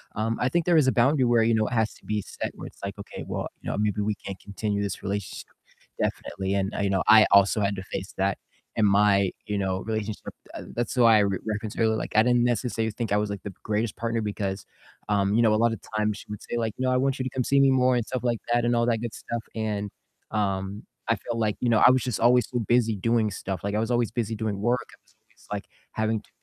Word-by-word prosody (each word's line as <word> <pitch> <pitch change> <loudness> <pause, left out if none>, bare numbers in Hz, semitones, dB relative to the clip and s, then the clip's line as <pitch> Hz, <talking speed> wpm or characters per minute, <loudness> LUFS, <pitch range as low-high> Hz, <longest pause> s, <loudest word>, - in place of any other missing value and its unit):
um, 110 +2 -1
I 125 - +2
think 170 +4 +1
there 175 -2 +4
is 150 -4 +4
a - - +5
boundary 130 +3 +3
where, 120 -1 +4
you 115 +1 +3
know, 110 -1 +2
it - - -4
has 110 -2 +1
to - - -21
be 105 0 -1
set - - -5
where, - - -8
it's - - -15
like, - - -5
okay, - - -7
"Well, - - -3
you - - -5
know, - - -2
maybe 105 0 0
we 105 0 0
can't 100 -1 -8
continue 100 0 -3
this 100 -3 -4
relationship," 100 -1 -4 0.5
definitely, 95 +2 -2
and, 100 +1 -1
you 100 - +1
know, 95 -1 +1
I 110 0 +8
also 100 +2 +5
had 100 0 +1
to 95 - -6
face 95 0 -6
that 95 +1 +1 0.4
in 110 - +4
my, 100 -1 +4 0.2
you 105 -1 -2
know, 95 -1 -1
relationship, 110 -1 -3 0.3
uh, - - -6
that's 120 +2 -2
why 115 -3 +7
I - - +5
re 100 -2 +1
reference 110 0 -3
her. 115 - +2
Like, 110 0 -2
I 110 - +6
didn't 120 0 +3
necessarily 115 -2 0
think 115 -4 -3
I 105 - +3
was, 105 0 0
like, 100 -2 -5
the 100 - -6
greatest 105 +1 -1
partner 115 0 -1
because, 100 -2 -3 0.4
um, 100 0 +2
you 115 - +4
know, 110 -2 +4
a - - +3
lot 115 -1 +3
of - - -6 0.2
times 105 -1 0
she - - -12
would 105 -1 -6
say 120 - -4
like, 115 -2 -1
"No, 130 0 +1
I 125 - +3
want 135 +1 0
you - - 0
to - - -1
come 130 0 -2
see 140 +3 +3
me 135 0 +6
more," 130 -1 +3
and 120 - 0
stuff 130 +1 -3
like 120 -2 0
that, 120 0 +2
and 120 0 +2
all 115 0 +2
that 115 -2 +2
good 120 -2 -4
stuff, 115 -1 -5
and, 105 -2 -2 0.4
um, 100 -1 -2 0.3
I - - +4
feel 120 -1 -5
like, 110 -2 0
you 125 - 0
know, 110 -2 +4
I - - +9
was 130 0 +2
just 125 -4 -2
always, 125 +1 +4
so 125 - -1
busy 120 -2 +3
doing 115 +2 +1
stuff, 95 -1 -4
like, 100 +1 -2
I - - +1
was 115 +2 -1
always 120 -2 +2
busy 115 -2 -2
doing 105 -2 -2
work. 120 +3 +2 0.2
I - - -32
was - - -29
always - - -25
like - - -3 0.3
having 110 0 -1
to - - -26
110 Hz, 270 wpm, -26 LUFS, 100-120 Hz, 0.5 s, I